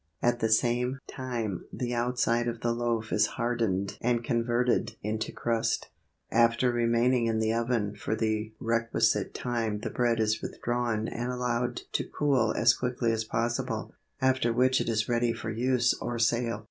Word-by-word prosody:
At 120 0 +1
the 110 - +1
same 120 +3 +2
time 120 -7 -4
the 125 -1 -3
outside 120 0 +1
of 120 0 -3
the 120 - +1
loaf 115 -2 -1
is 105 0 +4
hardened 115 -6 -1
and 120 0 +1
converted 120 +1 +1
into 110 +1 -2
crust. 115 -1 -1 0.4
After 115 +2 +3
remaining 120 +1 +2
in 115 -1 +1
the 110 0 +1
oven 115 -3 0
for 110 - -2
the 110 -1 -1
requisite 115 -3 +1
time 115 -4 -2
the - - -4
bread 120 -2 +1
is 110 0 +1
withdrawn 120 -2 -2
and 120 +1 -3
allowed 125 -1 -1
to - - 0
cool 130 -7 +1
as 115 +1 +5
quickly 125 -2 -1
as 110 -1 -1
possible, 115 +2 -2 0.3
after 130 -2 +2
which 130 +2 +3
it - - -2
is 110 -1 0
ready 120 -1 +1
for 115 - -5
use 120 +1 +2
or 120 - -3
sale. 115 0 +1
115 Hz, 160 wpm, -28 LUFS, 115-120 Hz, 0.4 s, as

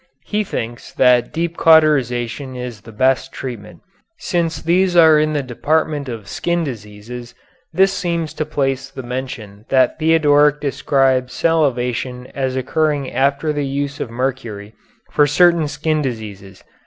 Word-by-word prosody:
He 210 +1 -1
thinks 120 - -6
that 125 -2 +3
deep 170 +1 -3
cauterization 135 -5 +3
of - - -8
it 125 - -5
is 120 -4 -7
the 115 - -13
best 130 +3 +1
treatment. 120 -6 -8 0.4
Since 165 -4 -2
these 180 +2 +2
are 160 -3 +7
in 155 0 +1
the 145 -2 -1
department 145 +2 -1
of 110 -4 -7
skin 170 +7 -1
diseases 120 -1 -8 0.4
this 190 +3 +3
seems 170 -4 -2
the 155 -1 -3
place 135 -3 -1
to 135 -1 -8
mention 120 -5 -6
that 130 +2 +2
Theodoric 150 -2 +4
describes 135 -3 +1
salivation 125 -5 0
as 130 -1 -2
occurring 145 +1 -1
after 140 +4 +1
the 145 -1 -2
use 140 +1 -3
of - - -4
mercury 115 -4 -4 0.4
for 145 -1 +3
certain 170 +1 +4
skin 155 +1 -1
diseases. 105 -7 -6
135 Hz, 145 wpm, -18 LUFS, 125-155 Hz, 0.4 s, are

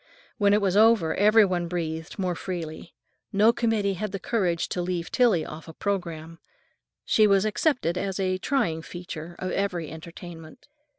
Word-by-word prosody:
When 200 -1 +4
it 210 - +2
was 195 -2 +1
over 215 -6 +5
every 210 +2 +5
one 175 -2 -1
breathed 165 -2 -4
more 185 -3 -1
freely. 170 -3 -6 0.4
No 215 +4 +5
committee 225 -4 +1
had 210 +2 -4
the 195 - -4
courage 180 -6 0
to 180 - -2
leave 175 -1 -3
Tillie 225 -11 +3
off 155 +2 -9
a 160 - -9
programme. 165 -4 -4 0.7
She 215 -1 +4
was 195 0 +3
accepted 215 - 0
as 195 0 -3
a 185 -1 0
trying 215 - 0
feature 175 -1 -8
of 185 - -4
every 180 -5 -2
entertainment. 165 - -11
185 Hz, 165 wpm, -26 LUFS, 170-205 Hz, 0.7 s, over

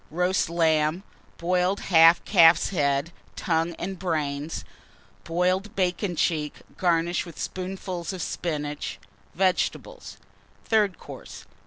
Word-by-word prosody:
Roast 180 +2 0
Lamb. 160 +1 +1 0.3
Boiled 180 +3 +1
Half 165 0 +7
Calf's 165 0 +5
Head, 145 -2 0 0.2
Tongue, 165 0 -1
and 185 +2 -5
Brains. 155 -4 -3 0.6
Boiled 185 +5 0
Bacon 185 0 -1
cheek, 155 -2 0 0.2
garnished 175 0 0
with 165 - -11
spoonfuls 185 -1 -5
of 185 -3 -5
Spinach. 150 -3 -4 0.4
Vegetables. 185 0 -1 0.5
THIRD 210 -5 +2
COURSE. - - -11
170 Hz, 105 wpm, -25 LUFS, 160-185 Hz, 0.6 s, Half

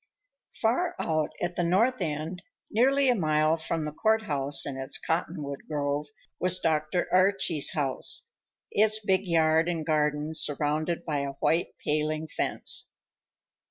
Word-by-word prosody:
Far 335 +11 +1
out 155 -2 0
at 175 - -2
the 175 - 0
north 225 +9 +2
end, 155 +4 -3 0.3
nearly 270 +5 +3
a 250 - +5
mile 155 -5 +2
from 160 0 -3
the 150 - -3
court 220 +7 +1
house 140 -5 +1
and 140 - -4
its 135 0 -1
cottonwood 160 -4 -3
grove, 145 0 -1 0.3
was 185 0 +2
Dr. 160 0 0
Archie's 185 -5 +3
house, 140 -4 0 0.4
its 215 +1 +3
big 190 0 +1
yard 160 0 +3
and 165 -3 -2
garden 150 0 0
surrounded 155 +2 0
by 150 -3 -1
a 140 0 -3
white 165 +5 0
paling 155 +1 -1
fence. - - -1
160 Hz, 140 wpm, -27 LUFS, 150-185 Hz, 0.4 s, a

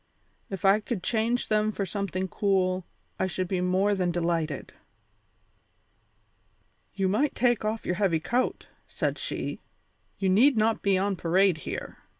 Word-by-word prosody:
If 195 -1 -5
I 195 +2 +6
could 210 -3 -4
change 235 +2 0
them 215 0 +2
for 200 -2 -3
something 190 -1 -3
cool 185 -2 0 0.3
I 190 - +1
should 185 0 -3
be 185 0 -1
more 190 +3 +2
than 185 -3 0
delighted." 165 -4 -2 2.2
"You 195 -1 +1
might 230 +10 +1
take 240 -3 +2
off 215 +1 -2
your 180 - 0
heavy 175 -5 +3
coat," 235 +10 -1 0.2
said - - -2
she; - - -3 0.6
"you 195 - 0
need 230 +8 +5
not 220 +1 +2
be 195 -1 +2
on 195 0 0
parade 180 +1 +3
here. - - -6
195 Hz, 150 wpm, -27 LUFS, 185-215 Hz, 2.2 s, I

